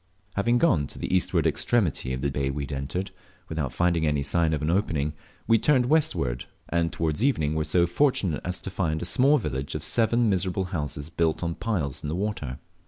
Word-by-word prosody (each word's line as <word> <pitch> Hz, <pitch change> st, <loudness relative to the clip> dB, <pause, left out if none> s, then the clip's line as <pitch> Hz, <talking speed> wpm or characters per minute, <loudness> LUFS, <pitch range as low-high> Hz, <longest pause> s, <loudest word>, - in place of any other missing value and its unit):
Having 120 Hz, +4 st, +2 dB
gone 85 Hz, -, +3 dB
to -, -, -9 dB
the -, -, -1 dB
eastward 90 Hz, -3 st, +1 dB
extremity 80 Hz, -, +1 dB
of 65 Hz, 0 st, -3 dB
the 70 Hz, 0 st, 0 dB
deep 70 Hz, -, -2 dB
bay 70 Hz, -, +1 dB
we 70 Hz, +1 st, -3 dB
had 70 Hz, -, -6 dB
entered, 90 Hz, +8 st, -3 dB, 0.4 s
without 75 Hz, -6 st, -2 dB
finding 85 Hz, +1 st, +1 dB
any 75 Hz, -1 st, +1 dB
sign 80 Hz, +3 st, +2 dB
of 75 Hz, -1 st, -1 dB
an 80 Hz, -, +1 dB
opening, 80 Hz, -6 st, 0 dB, 0.3 s
we 115 Hz, -1 st, +4 dB
turned 130 Hz, -2 st, +3 dB
westward; 125 Hz, -, +1 dB, 0.2 s
and 85 Hz, -1 st, +1 dB
towards 80 Hz, +5 st, -1 dB
evening 80 Hz, -, +2 dB
were 80 Hz, 0 st, 0 dB
so 85 Hz, +3 st, +3 dB
fortunate 90 Hz, -, +1 dB
as 90 Hz, 0 st, -3 dB
to 95 Hz, -, -5 dB
find 80 Hz, -4 st, -1 dB
a -, -, -2 dB
small 135 Hz, +10 st, +4 dB
village 70 Hz, -, -3 dB
of 75 Hz, -, -3 dB
seven 115 Hz, +8 st, +2 dB
miserable 95 Hz, -1 st, 0 dB
houses 75 Hz, -1 st, -4 dB
built 85 Hz, 0 st, 0 dB
on 85 Hz, 0 st, -1 dB
piles 85 Hz, -, -2 dB
in 75 Hz, -, -4 dB
the 80 Hz, -, -2 dB
water. 95 Hz, -10 st, -3 dB
85 Hz, 210 wpm, -26 LUFS, 75-100 Hz, 0.4 s, we